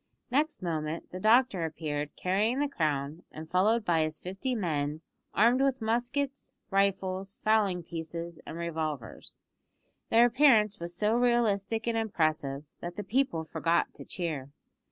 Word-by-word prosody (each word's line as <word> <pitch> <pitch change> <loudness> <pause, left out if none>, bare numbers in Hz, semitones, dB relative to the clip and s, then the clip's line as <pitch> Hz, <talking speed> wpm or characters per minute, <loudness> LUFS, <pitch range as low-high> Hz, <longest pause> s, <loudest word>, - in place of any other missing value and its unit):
Next 295 -3 +1
moment 160 -1 -3
the 185 - -6
doctor 220 -3 +4
appeared 150 -2 -3
carrying 205 +7 +1
the 290 +1 +1
crown, 150 - -1
and 155 +1 -8
followed 210 +6 +2
by 165 -2 +3
his 155 0 -1
fifty 195 +8 -3
men, 155 -6 -1 0.3
armed 235 +5 +4
with 270 -1 +2
muskets, 245 +5 -2 0.2
rifles, 195 0 0
fowling 205 -5 +2
pieces, 165 0 -6
and 160 - -6
revolvers. 160 -7 -4 0.7
Their 230 +1 +6
appearance 230 -5 +4
was 170 +1 -5
so 210 +4 +2
realistic 225 -3 +2
and 235 -1 0
impressive 155 -9 0 0.2
that 175 0 -6
the 205 - -4
people 210 -6 0
forgot 165 +2 0
to - - -10
cheer. 155 -7 -4
185 Hz, 140 wpm, -29 LUFS, 160-230 Hz, 0.7 s, Their